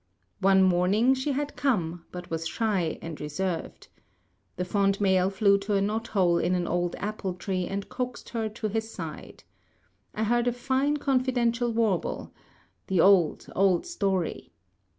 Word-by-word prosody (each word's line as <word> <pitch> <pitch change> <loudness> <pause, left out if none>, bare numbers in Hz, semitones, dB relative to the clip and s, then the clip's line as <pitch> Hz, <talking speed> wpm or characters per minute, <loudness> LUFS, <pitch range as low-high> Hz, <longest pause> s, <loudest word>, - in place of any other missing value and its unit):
One 190 -1 +5
morning 190 +7 +3
she 270 +2 -1
had 290 +1 -3
come, 175 - -1
but 180 -1 -8
was 165 0 -2
shy 195 -5 -1
and 165 -2 -7
reserved. 165 +3 -4 0.7
The 180 - -2
fond 195 +1 +1
male 190 -2 +3
flew 200 0 +3
to 200 +1 -1
a 195 - +2
knot 220 +3 -1
hole 180 -4 +2
in 180 - +1
an 175 -1 0
old 175 0 -1
apple 200 -3 -4
tree 185 -1 -2
and 200 0 -4
coaxed 250 -1 -5
her 225 -2 -2
to 215 +1 -4
his 220 +1 -2
side. 165 -6 -8 0.7
I 220 - -1
heard 240 +2 +2
a 245 - +2
fine 270 +4 0
confidential 250 -4 +1
warble 220 -6 -1 0.5
the 190 -2 +1
old, 185 -3 +4
old 190 -2 +3
story. 195 - -2
200 Hz, 155 wpm, -27 LUFS, 180-235 Hz, 0.7 s, One